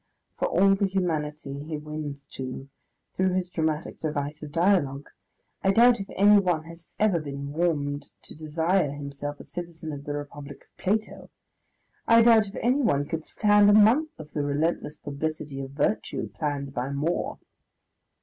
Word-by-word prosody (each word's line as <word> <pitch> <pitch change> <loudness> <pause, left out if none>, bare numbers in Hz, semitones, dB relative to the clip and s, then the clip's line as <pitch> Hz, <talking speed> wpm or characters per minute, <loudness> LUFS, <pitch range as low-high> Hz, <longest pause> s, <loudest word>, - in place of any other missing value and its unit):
For - - +1
all 195 +3 +4
the 195 0 +1
humanity 150 -7 -2
he 155 +1 -5
wins 150 -2 -6
to, 130 +1 -6 0.5
through 185 0 +1
his 180 -1 -1
dramatic 155 -2 -2
device 150 -1 -3
of 150 -1 -8
dialogue, 165 -5 +1 0.5
I 195 - +3
doubt 235 +3 +6
if 195 - -6
anyone 195 -5 +4
has 165 +1 -13
ever 210 -5 +3
been 140 -1 -6
warmed 145 -4 -1
to - - -9
desire 160 +2 0
himself 145 0 -6
a - - -9
citizen 170 -2 -6
in 140 - -6
the 145 0 -5
Republic 145 -1 -8
of - - -37
Plato; 215 +3 -2 0.8
I 230 0 +7
doubt 225 -2 +6
if 195 - -10
anyone 240 - +2
could 160 +2 -4
stand 205 +1 +4
a - - +6
month 225 +9 +5
of 150 -1 -10
the 150 - -2
relentless 150 +1 -1
publicity 145 -1 -4
of 135 - -6
virtue 145 +10 -1
planned 140 -3 -3
by 125 +1 -2
More.... 145 +5 -1
155 Hz, 160 wpm, -26 LUFS, 145-190 Hz, 0.8 s, I